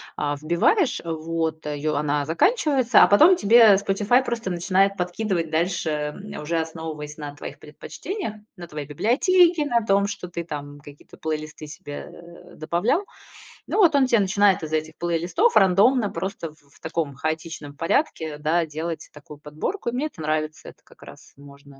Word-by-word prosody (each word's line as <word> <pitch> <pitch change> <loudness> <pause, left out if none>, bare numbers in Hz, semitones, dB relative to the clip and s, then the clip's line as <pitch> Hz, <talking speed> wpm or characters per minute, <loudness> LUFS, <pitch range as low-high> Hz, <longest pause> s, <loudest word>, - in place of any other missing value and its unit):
а, 145 -1 -2
вбиваешь, 175 - +2
вот, 160 -1 -3
её 150 0 -2
она 145 0 0
заканчивается, 260 - +3
а - - +6
потом 315 - +6
тебе 225 - +6
Spotify 205 +6 +2
просто 230 -6 -3
начинает 190 +3 +2
подкидывать 180 -2 -2
дальше, 170 +1 0
э, 150 +6 -5
уже 165 +2 -1
основываясь 160 -2 -6
на 145 -1 -7
твоих - - -9
предпочтениях, 210 - -7 0.2
на 175 -2 -9
твоей 150 -2 -7
библиотеке, 320 - +3
на 235 -5 +1
том, 200 0 +2
что 195 -3 -6
ты 170 -1 -5
там 145 -2 -7
какие-то 145 0 -15
плейлисты 155 -1 -5
себе, 145 -1 -9
э, 170 0 -14
добавлял. 190 - 0 0.6
Ну, - - -2
вот 350 -7 +5
он 270 -2 +4
тебе 235 -3 +3
начинает 195 -2 +2
из 155 0 -6
этих 155 0 -2
плейлистов 175 - 0
рандомно, 205 +4 +4
просто 190 -5 -5
в - - -27 0.2
в - - -21
таком 160 -3 -3
хаотичном 155 0 -5
порядке, 160 - -1
да, 165 +3 +1
делать 160 +1 -6
такую 150 0 -13
подборку. 155 - -4
И - - -3
мне 280 +5 -1
это 185 - -12
нравится, 155 0 -3
это - - -18
как - - -19
раз - - -14
можно. 140 -1 -16
170 Hz, 165 wpm, -23 LUFS, 155-210 Hz, 0.6 s, а